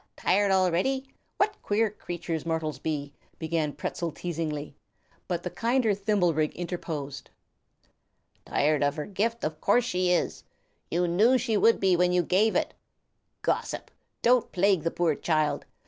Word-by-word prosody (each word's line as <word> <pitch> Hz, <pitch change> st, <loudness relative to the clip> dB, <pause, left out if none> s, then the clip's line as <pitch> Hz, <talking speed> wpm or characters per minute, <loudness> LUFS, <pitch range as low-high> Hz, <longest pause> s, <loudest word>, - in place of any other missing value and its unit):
Tired 200 Hz, +1 st, +2 dB
already? 190 Hz, +8 st, +2 dB, 0.3 s
What 415 Hz, +1 st, 0 dB
queer 215 Hz, +1 st, +1 dB
creatures 175 Hz, -5 st, -5 dB
mortals 160 Hz, -2 st, -2 dB
be!" 145 Hz, -2 st, -3 dB, 0.2 s
began 160 Hz, -2 st, -1 dB
Pertzal 170 Hz, +3 st, -4 dB
teasingly; 155 Hz, -4 st, -4 dB, 0.5 s
but 175 Hz, -2 st, -2 dB
the 180 Hz, -, -4 dB
kinder 235 Hz, -2 st, +1 dB
Thimblerig 180 Hz, -7 st, +1 dB
interposed. 155 Hz, -6 st, -5 dB, 1.1 s
"Tired 150 Hz, 0 st, +1 dB
of 145 Hz, 0 st, +1 dB
her 150 Hz, -, -4 dB
gift, 225 Hz, +4 st, -2 dB
of 155 Hz, 0 st, -3 dB
course 240 Hz, +4 st, +3 dB
she 180 Hz, -5 st, +1 dB
is! 180 Hz, -, 0 dB, 0.5 s
You 175 Hz, +1 st, +1 dB
knew 215 Hz, +10 st, +4 dB
she 240 Hz, -3 st, -1 dB
would 225 Hz, +2 st, +4 dB
be 190 Hz, -2 st, +3 dB
when 180 Hz, +1 st, +3 dB
you 180 Hz, -1 st, +3 dB
gave 200 Hz, +6 st, +2 dB
it, -, -, 0 dB, 0.7 s
Gossip! -, -, -2 dB, 0.3 s
Don't 245 Hz, -1 st, +3 dB
plague 190 Hz, -1 st, +3 dB
the 165 Hz, -, 0 dB
poor 170 Hz, -2 st, +1 dB
child. 155 Hz, 0 st, 0 dB
180 Hz, 145 wpm, -27 LUFS, 160-205 Hz, 1.1 s, knew